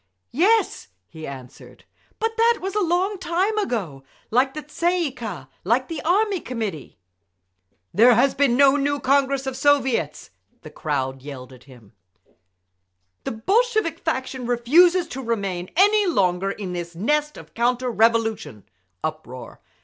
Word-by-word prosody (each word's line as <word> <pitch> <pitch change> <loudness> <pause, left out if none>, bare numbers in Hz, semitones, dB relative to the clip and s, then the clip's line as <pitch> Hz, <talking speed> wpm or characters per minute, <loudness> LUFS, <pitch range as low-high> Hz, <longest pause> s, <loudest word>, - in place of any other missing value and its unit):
"Yes," 415 - +2 0.2
he 160 -2 -9
answered, 130 -2 -12 0.3
"but 450 0 -2
that 460 +1 +3
was 385 +1 -4
a 425 - 0
long 370 +3 0
time 375 +5 0
ago—like 225 - -2
the 305 - -5
Tsay 345 +4 -1
ee 320 -5 -1
kah—like 230 - -3
the 325 -2 -4
Army 390 +3 +1
Committee." 220 - -6 1.0
"There 235 +6 +6
has 260 +4 +3
been 265 -4 +2
no 280 0 +6
new 285 0 0
Congress 275 0 +1
of 265 -1 -3
Soviets!" 265 - +1 0.3
they 155 - -11 0.5
yelled 130 -2 -10
at 125 -1 -17
him. 120 -6 -17 1.3
"The - - -2
Bolshevik 430 - 0
faction 260 -5 -3
refuses 335 +9 +4
to 265 - -6
remain 195 -7 -3
any 410 +1 +4
longer 190 - +1
in 195 -2 -5
this 170 -1 -6
nest 300 - 0
of - - -13
counter 245 +1 0
revolution—" 225 - +1 0.4
Uproar. 155 -5 -6
255 Hz, 135 wpm, -22 LUFS, -, 1.3 s, There